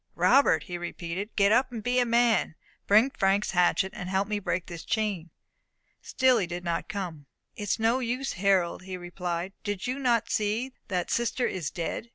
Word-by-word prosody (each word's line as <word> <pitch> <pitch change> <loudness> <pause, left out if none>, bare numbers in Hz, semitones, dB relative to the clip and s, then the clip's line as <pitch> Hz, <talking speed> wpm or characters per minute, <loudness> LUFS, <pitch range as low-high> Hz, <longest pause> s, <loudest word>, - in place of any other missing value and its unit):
"Robert," 160 - +4
he 175 +2 -6
repeated, 175 +3 -5
"get 200 0 +4
up, 255 +3 +3
and 225 -3 -6
be 250 +1 +2
a 245 - +2
man. 230 -7 +2 0.3
Bring 220 +7 +5
Frank's 200 -2 +1
hatchet, 180 +1 +2
and 180 -1 -5
help 190 +1 0
me 210 -1 -1
break 185 -2 -2
this 170 -2 -8
chain." 200 -6 -2 0.7
Still 255 -2 +3
he 185 - -1
did 175 +1 -5
not 170 +2 -2
come. 175 -9 -5 0.3
"It - - -9
is - - +2
no 225 +3 +2
use, 255 +2 -2
Harold," 185 -2 +1
he 185 0 -6
replied. 175 +1 -4
"Do 205 -1 -2
you 250 +7 -3
not 240 -4 +1
see 220 +5 -1
that 180 -4 -2
sister 240 +1 0
is 175 -7 -2
dead? 180 +7 -4
200 Hz, 190 wpm, -27 LUFS, 175-235 Hz, 0.7 s, Bring